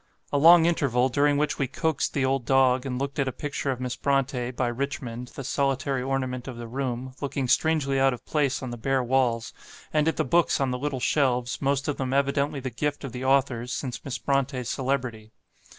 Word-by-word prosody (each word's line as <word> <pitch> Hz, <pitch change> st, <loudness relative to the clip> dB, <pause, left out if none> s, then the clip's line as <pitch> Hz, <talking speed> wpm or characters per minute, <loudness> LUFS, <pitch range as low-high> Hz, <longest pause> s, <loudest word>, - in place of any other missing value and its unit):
A -, -, +3 dB
long 165 Hz, +2 st, +8 dB
interval, 135 Hz, -7 st, +2 dB
during 145 Hz, +2 st, +2 dB
which 150 Hz, +1 st, 0 dB
we 135 Hz, -, +1 dB
coaxed 160 Hz, +2 st, -1 dB
the 135 Hz, -2 st, +2 dB
old 135 Hz, -1 st, 0 dB
dog, 130 Hz, 0 st, +3 dB
and 125 Hz, -1 st, -3 dB
looked 140 Hz, +2 st, -3 dB
at 135 Hz, -, +1 dB
a -, -, 0 dB
picture 140 Hz, +1 st, -4 dB
of 130 Hz, -2 st, -1 dB
Miss 125 Hz, -1 st, -3 dB
Brontë, 130 Hz, -3 st, 0 dB
by 125 Hz, -, 0 dB
Richmond, 125 Hz, -1 st, -4 dB
the 135 Hz, -, -5 dB
solitary 135 Hz, 0 st, 0 dB
ornament 130 Hz, -1 st, -2 dB
of 130 Hz, -3 st, -6 dB
the 120 Hz, -, -6 dB
room, 130 Hz, 0 st, -4 dB
looking 140 Hz, -2 st, -2 dB
strangely 140 Hz, -1 st, +2 dB
out 135 Hz, 0 st, +4 dB
of 125 Hz, -, -7 dB
place 140 Hz, -4 st, 0 dB
on 130 Hz, -, -4 dB
the 120 Hz, -, -5 dB
bare 135 Hz, +2 st, +1 dB
walls, 120 Hz, -2 st, +1 dB, 0.4 s
and 155 Hz, 0 st, +2 dB
at 160 Hz, -, +1 dB
the -, -, +1 dB
books 170 Hz, +5 st, +2 dB
on 135 Hz, -2 st, +1 dB
the 125 Hz, -, -2 dB
little 140 Hz, -1 st, -2 dB
shelves, 125 Hz, -2 st, +1 dB
most 140 Hz, 0 st, 0 dB
of 145 Hz, -, -1 dB
them 130 Hz, -1 st, -2 dB
evidently 140 Hz, +1 st, +1 dB
the 130 Hz, -1 st, -5 dB
gift 145 Hz, +5 st, -2 dB
of 135 Hz, -, -5 dB
the 125 Hz, +2 st, -6 dB
authors 130 Hz, -2 st, +1 dB
since 130 Hz, -3 st, -4 dB
Miss 135 Hz, -2 st, -4 dB
Brontë's 135 Hz, -2 st, -1 dB
celebrity. 125 Hz, -5 st, -2 dB
135 Hz, 215 wpm, -26 LUFS, 125-140 Hz, 0.4 s, long